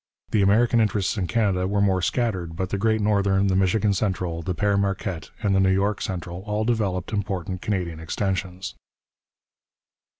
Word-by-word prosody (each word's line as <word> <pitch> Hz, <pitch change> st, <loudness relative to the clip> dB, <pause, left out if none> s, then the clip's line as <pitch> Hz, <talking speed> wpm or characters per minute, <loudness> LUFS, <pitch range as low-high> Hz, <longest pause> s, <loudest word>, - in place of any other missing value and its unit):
The 105 Hz, -, +3 dB
American 115 Hz, +4 st, +4 dB
interests 105 Hz, -2 st, +1 dB
in 95 Hz, -4 st, -1 dB
Canada 95 Hz, -5 st, +1 dB
were 100 Hz, +1 st, 0 dB
more 95 Hz, -2 st, +2 dB
scattered, 90 Hz, -5 st, -1 dB
but 95 Hz, +1 st, -2 dB
the 100 Hz, -, -1 dB
Great 110 Hz, +1 st, +2 dB
Northern, 100 Hz, -2 st, +2 dB
the 95 Hz, -1 st, +2 dB
Michigan 95 Hz, +2 st, +2 dB
Central, 90 Hz, -4 st, -1 dB
the 90 Hz, +2 st, -3 dB
Père 100 Hz, +2 st, +2 dB
Marquette, 95 Hz, -3 st, -2 dB
and 100 Hz, -1 st, +2 dB
the 95 Hz, -, +3 dB
New 95 Hz, 0 st, +4 dB
York 100 Hz, +2 st, +1 dB
Central 90 Hz, -1 st, -4 dB
all 105 Hz, +1 st, 0 dB
developed 105 Hz, -5 st, -1 dB
important 95 Hz, -3 st, -3 dB
Canadian 90 Hz, -6 st, -2 dB
extensions. 90 Hz, -3 st, -3 dB
95 Hz, 165 wpm, -24 LUFS, 90-105 Hz, -, American